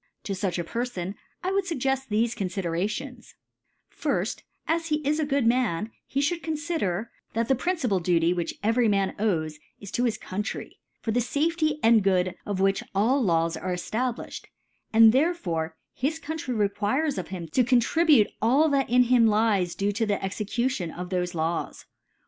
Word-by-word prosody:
To 200 - -3
fuch 190 -2 -2
a 175 - -1
Perfoii 200 -3 -3 0.3
I 370 - 0
would 390 -1 +1
fuggcft 270 -5 -1
tbcfe 225 +2 +1
tonfiderations: 200 +7 -3 0.6
Firji^ - - -1 0.3
As 330 0 0
he 305 - +1
is 300 +2 +2
a 305 - 0
gpod 280 -3 +1
Man, 225 -4 +1 0.2
he 275 +1 0
(hould 335 +3 0
confider, 300 - -2 0.2
that 230 0 0
the 270 - +4
principal 265 - 0
Duty 170 -1 +2
which 175 -2 -3
every 230 +2 +3
Man 195 -2 +1
owes, 160 -8 0 0.2
is 200 - -9
to 245 - 0
his 230 - 0
Country, 205 +3 -5 0.2
for 225 - -1
the 245 +3 +2
Safety 310 +4 0
and 225 -1 +6
Good 185 -2 +2
of 200 -2 -2
which 195 0 +2
all 240 +8 +3
Laws 165 -3 +2
are 180 +3 -3
c^ 180 - -6
ftablilhed; 245 +1 -3 0.5
^and 225 0 +8
therefore 195 - 0 0.2
his 295 +5 -1
Country 305 -5 -4
re 210 -2 +3
quires 245 +7 0
of 180 - -5
him 180 -3 -6
to 255 - +3
<contribute 255 +1 +4
all 270 +8 +4
that 275 -3 +1
in 250 +1 +5
hini 240 -2 +4
lies 210 -5 +2
to 200 +1 0
the - - -7
(Jue 205 - +2
Execution 210 +1 -2
of 180 +2 -7
thofe 180 -1 -2
Laws. 165 +1 -2
225 Hz, 175 wpm, -26 LUFS, 185-270 Hz, 0.6 s, ^and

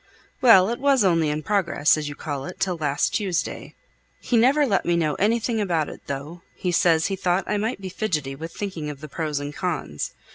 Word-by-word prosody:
"Well, 220 -6 +7
it 235 - -3
was 275 -3 +3
only 165 -5 +3
in 150 +1 -2
progress, 175 -7 +2
as 150 -1 -4
you 145 - -7
call 145 -3 -5
it, - - -8
till 185 -2 0
last 145 -3 0
Tuesday. 190 -5 -2 0.4
He 245 - -1
never 265 +6 +4
let 205 -7 +1
me 170 0 +1
know 155 -3 +1
anything 225 +2 +1
about 170 -6 0
it, - - -10
though; 145 +5 -6
he 180 - -2
says 165 -2 +3
he 195 - -1
thought 180 0 0
I 210 - -1
might 220 +3 -2
be 190 -1 -6
fidgety 155 -9 -2
with 160 +4 -7
thinking 180 -7 -5
of 145 -1 -8
the 155 - -7
pros 150 -1 -3
and 145 0 -5
cons. 155 - -3
175 Hz, 215 wpm, -24 LUFS, 150-205 Hz, 0.4 s, Well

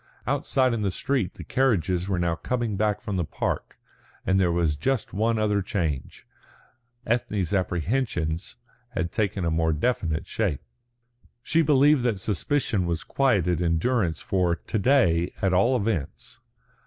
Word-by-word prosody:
Outside 130 -2 +1
in 115 - -2
the 100 - +1
street 120 +2 -1
the - - -8
carriages 95 - +1
were 95 - 0
now 85 -1 +1
coming 120 +4 -2
back 105 +1 0
from 100 -2 -3
the 90 - +1
park, - - -3 0.5
and 95 0 +2
there 90 -2 +3
was 85 -3 +1
just 115 - -1
one 110 +3 +1
other 105 -2 +1
change. 80 -8 -3 0.8
Ethne's 105 -6 -1
apprehensions 90 - -1 0.4
had 85 -2 -1
taken 100 -4 -1
a 85 - +1
more 80 0 +1
definite 80 -3 -1
shape. 95 -11 -2 0.8
She 165 - +2
believed 145 -1 +4
that 115 -5 0
suspicion 105 - 0
was 85 -1 -2
quieted 95 - +1
in 85 -1 +2
Durrance 90 - 0
for 90 -3 +1
to 110 - -4
day, 95 -9 +3
at 95 -1 +1
all 120 +8 +3
events. 100 - -3
95 Hz, 150 wpm, -25 LUFS, 85-120 Hz, 0.8 s, believed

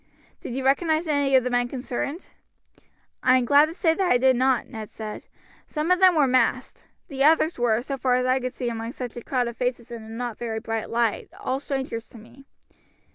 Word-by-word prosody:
"Did 240 - -6
you 265 0 -3
recognize 315 +4 +2
any 285 -3 +2
of 260 - +5
the 250 - -2
men 245 0 +1
concerned?" 270 +5 -4 1.0
"I 255 0 +5
am 250 - 0
glad 290 +4 +5
to 325 - -8
say 335 -3 +2
I 360 -10 +3
did 260 +1 +4
not," 255 0 +2
Ned 220 -2 -8
replied. 215 -1 -7 0.4
"Some 310 +3 -2
of 365 - +4
them 370 -2 +6
were 300 -3 +4
masked. 255 0 0 0.2
The 275 -2 -2
others 315 0 +3
were, 235 -1 +1
so 275 +1 -4
far 250 -1 +2
as 250 0 +1
I 255 +1 +2
could 255 0 -3
see 250 - -3
among 230 +1 -5
such 245 -3 -6
a 240 - -6
crowd 250 -3 -1
of 235 -1 -7
faces 245 -1 -3
in 235 -1 -7
a 220 - -12
not 235 0 -5
very 225 -2 -3
bright 225 -1 -4
light, 230 -2 0
all 260 +1 -2
strangers 265 -5 -4
to - - -14
me." 235 +5 -16
255 Hz, 220 wpm, -24 LUFS, 235-275 Hz, 1.0 s, them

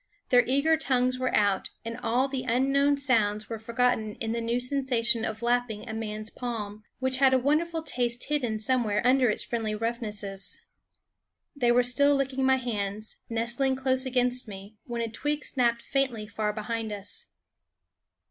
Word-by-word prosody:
Their 245 -1 +6
eager 280 +5 +3
tongues 255 -3 +1
were 255 - 0
out, 200 -2 +2 0.2
and 230 0 -4
all 250 +4 +1
the 265 -1 -3
unknown 275 +4 +2
sounds 215 -6 +1
were 225 - -3
forgot 240 +3 +2
ten 215 -1 -6
in 225 -1 -2
the 235 0 -1
new 235 +1 0
sensation 250 -3 +1
of 220 0 -4
lapping 240 -3 0
a 220 - -5
man's 215 0 -4
palm, 215 -4 -5 0.2
with 260 0 0
a 260 -1 +6
wonderful 315 +5 0
taste 245 -5 -1
hidden 255 -7 -1
some 250 +3 +1
where 210 +1 -1
under 255 -1 +4
its 210 - +2
friendly 225 -3 -2
roughnesses. 210 -4 -3 1.0
They 245 -4 +2
were 245 +1 +4
still 285 +4 +4
licking 270 -1 -1
my 265 0 +4
hands, 215 -4 -4
nestling 235 +4 0
close 260 0 +1
against 250 -1 +1
me, 200 +1 -10
when 235 -1 -3
a - - -1
twig 295 +6 -2
snapped 235 -3 +1
faintly 260 -6 -1
far 210 0 -2
behind 220 +1 -4
us. 205 -1 -4
240 Hz, 165 wpm, -27 LUFS, 220-260 Hz, 1.0 s, Their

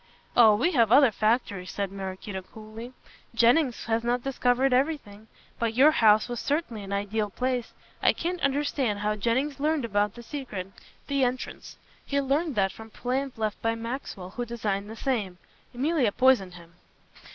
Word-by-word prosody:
"Oh, 220 -3 +7
we 285 +12 +1
have 230 - +3
other 270 -1 +7
factories," 215 -4 0
said 200 -2 -3
Maraquito 190 0 -6
coolly, 220 +5 -10 0.4
"Jennings 245 +3 +3
has 230 0 0
not 240 +1 0
discovered 260 0 +1
everything. 250 -7 -1 0.3
But 230 -1 -1
your 280 +5 +7
house 215 -7 +4
was 240 -2 -4
certainly 285 -7 -2
an 200 0 -8
ideal 205 +1 -1
place. 250 +2 -2 0.3
I - - +5
can't 355 +1 -3
understand 275 -5 0
how 210 +1 -1
Jennings 260 +7 -1
learned 300 -2 +1
about 205 -2 0
the 240 - -10
secret 220 -9 -6 0.2
" - - -30
"The 280 -1 +1
entrance. 255 +1 -3 0.3
He 280 - -1
learned 280 +2 0
that 195 -2 +2
from 220 +3 -12
plans 255 +4 -3
left 215 -2 -2
by 225 0 0
Maxwell 230 -5 -6
who 245 - -4
designed 210 -4 -3
the 220 - -7
same. 215 -7 -2 0.3
Emilia 265 -2 +1
poisoned 235 -7 +3
him." 170 -1 -14
235 Hz, 165 wpm, -27 LUFS, 210-270 Hz, 0.4 s, Oh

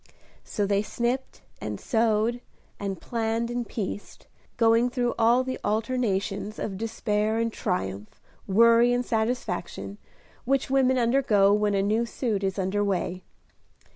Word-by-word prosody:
So 205 - -2
they 200 0 +2
snipped 240 +4 -3 0.2
and - - -4
sewed, 225 0 +1 0.4
and 195 -3 -4
planned 230 0 -2
and 240 -1 -3
pieced, 205 -1 -6 0.3
going 230 +1 +4
through 245 -1 0
all 235 +3 +4
the 260 0 -4
alternations 215 -3 -1
of 195 - -4
despair 215 0 -1
and 230 0 0
triumph, 105 - -3 0.3
worry 230 +4 +5
and 245 0 0
satisfaction, 220 -4 -2 0.4
which 270 +1 0
women 260 -1 +3
undergo 230 -5 +3
when 210 -1 +2
a 195 - +2
new 220 +4 +1
suit 220 -5 -2
is 190 0 -1
under 195 +2 0
way. 185 -2 -1
220 Hz, 135 wpm, -26 LUFS, 200-240 Hz, 0.4 s, worry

